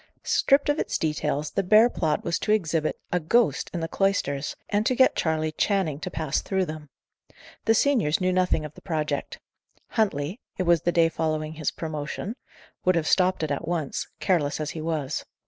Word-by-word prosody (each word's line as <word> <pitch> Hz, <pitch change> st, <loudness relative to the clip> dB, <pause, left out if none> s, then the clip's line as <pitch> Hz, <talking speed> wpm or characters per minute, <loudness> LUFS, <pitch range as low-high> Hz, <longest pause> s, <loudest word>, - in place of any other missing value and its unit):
Stripped 275 Hz, +1 st, +3 dB
of 290 Hz, +1 st, +1 dB
its -, -, -1 dB
details, 150 Hz, -1 st, -1 dB
the -, -, 0 dB
bare 215 Hz, +5 st, +6 dB
plot 160 Hz, -10 st, -1 dB
was 170 Hz, -, -1 dB
to 210 Hz, -, -1 dB
exhibit 165 Hz, -7 st, 0 dB
a 180 Hz, -, +2 dB
"ghost" 230 Hz, +9 st, +2 dB
in 175 Hz, -, -3 dB
the 165 Hz, -, -2 dB
cloisters, 160 Hz, -8 st, 0 dB
and 205 Hz, +1 st, +1 dB
to 255 Hz, -, +2 dB
get 260 Hz, +1 st, +4 dB
Charley 155 Hz, -1 st, 0 dB
Channing 160 Hz, -3 st, 0 dB
to -, -, -4 dB
pass 155 Hz, -2 st, -1 dB
through 190 Hz, -1 st, 0 dB
them. 155 Hz, -2 st, -8 dB, 0.8 s
The 225 Hz, -, +4 dB
seniors 225 Hz, -, +2 dB
knew 185 Hz, -1 st, +1 dB
nothing 180 Hz, -4 st, +1 dB
of 150 Hz, -, -8 dB
the -, -, -14 dB
project. 155 Hz, -4 st, -3 dB, 0.5 s
Huntley 190 Hz, -, -1 dB, 0.2 s
it 185 Hz, -, 0 dB
was 170 Hz, -3 st, +3 dB
the 175 Hz, -, +1 dB
day 165 Hz, -1 st, +4 dB
following 155 Hz, -1 st, -2 dB
his 155 Hz, -1 st, -1 dB
promotion 155 Hz, +7 st, -5 dB, 0.5 s
would 185 Hz, 0 st, +3 dB
have 165 Hz, -2 st, +1 dB
stopped 185 Hz, -1 st, +2 dB
it 155 Hz, -, -1 dB
at 145 Hz, +3 st, -3 dB
once, 165 Hz, -5 st, -2 dB
careless 160 Hz, -7 st, +1 dB
as 155 Hz, 0 st, -2 dB
he 160 Hz, -, -6 dB
was. 155 Hz, -4 st, -2 dB
165 Hz, 190 wpm, -26 LUFS, 155-190 Hz, 0.8 s, bare